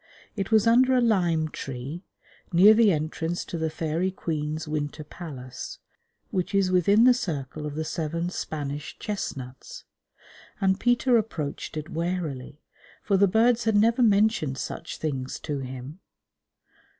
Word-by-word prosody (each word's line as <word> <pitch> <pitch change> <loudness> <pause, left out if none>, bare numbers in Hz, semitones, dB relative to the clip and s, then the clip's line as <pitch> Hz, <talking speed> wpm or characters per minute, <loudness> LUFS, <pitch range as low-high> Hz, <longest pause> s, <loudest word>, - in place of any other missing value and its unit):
It 195 -3 -3
was 220 -1 +4
under 255 +3 +5
a - - +4
lime 175 -9 +2
tree, 135 +4 -6 0.5
near 190 +5 +8
the 220 -2 +5
entrance 160 +2 -2
to - - -6
the 160 0 0
Fairy 160 +3 -1
Queen's 155 -4 -3
Winter 150 0 -3
Palace 130 -6 -8 0.5
(which 185 +1 -1
is 195 -2 +3
within 200 +5 +4
the 250 0 +7
circle 155 - -4
of 145 - -6
the 160 +1 -2
seven 165 +2 -2
Spanish 145 -3 -5
chestnuts), 130 -11 -6 0.8
and 190 0 +2
Peter 245 0 +3
approached 155 -8 -3
it 155 0 -4
warily, 160 -5 -4 0.4
for 200 - +2
the 200 +1 +5
birds 230 +4 +3
had 220 -1 +2
never 230 +4 +4
mentioned 205 - +3
such - - -5
things 135 -4 -3
to 145 -3 -3
him. 130 +5 -7
170 Hz, 140 wpm, -26 LUFS, 150-205 Hz, 0.8 s, near